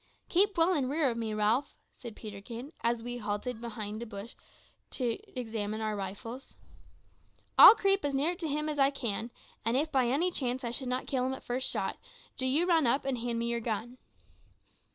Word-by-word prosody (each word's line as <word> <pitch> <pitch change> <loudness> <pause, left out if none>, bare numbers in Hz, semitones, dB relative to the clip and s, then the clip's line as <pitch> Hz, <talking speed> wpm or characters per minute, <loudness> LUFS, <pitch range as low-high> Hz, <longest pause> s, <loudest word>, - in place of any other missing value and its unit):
"Keep 395 +2 +3
well 335 +3 +4
in 275 -6 0
rear 290 -2 +2
of 230 - -5
me, 225 -2 -2
Ralph," 215 +6 +1 0.2
said 235 -4 -9
Peterkin, 230 +7 -8
as 235 0 0
we 245 0 -5
halted 215 +2 -3
behind 215 -2 -5
a 235 - -5
bush 205 +1 -8 0.6
to 240 -4 -2 0.2
examine 220 -2 -3
our 215 -1 -1
rifles. 205 +6 -7 1.0
"I'll - - +11
creep 395 -2 +2
as 285 -1 -1
near 300 +6 +2
to 340 -3 -3
him 300 +1 -1
as 300 -1 -2
I 275 0 +6
can, 235 -5 -2 0.3
and 230 +3 +1
if 310 +3 0
by 260 -3 +3
any 310 +9 +1
chance 260 -4 -1
I 235 - -2
should 250 +1 -2
not 255 +1 -1
kill 255 -2 0
him 260 - -1
at - - -10
the - - -26
first 250 +2 0
shot, - - -2 0.4
do 260 - -2
you 295 +7 +3
run 330 -6 +3
up 265 +4 +2
and 265 -3 -1
hand 235 0 -2
me 235 - -1
your 235 0 0
gun." 230 +2 -4
245 Hz, 205 wpm, -30 LUFS, 225-280 Hz, 1.0 s, I'll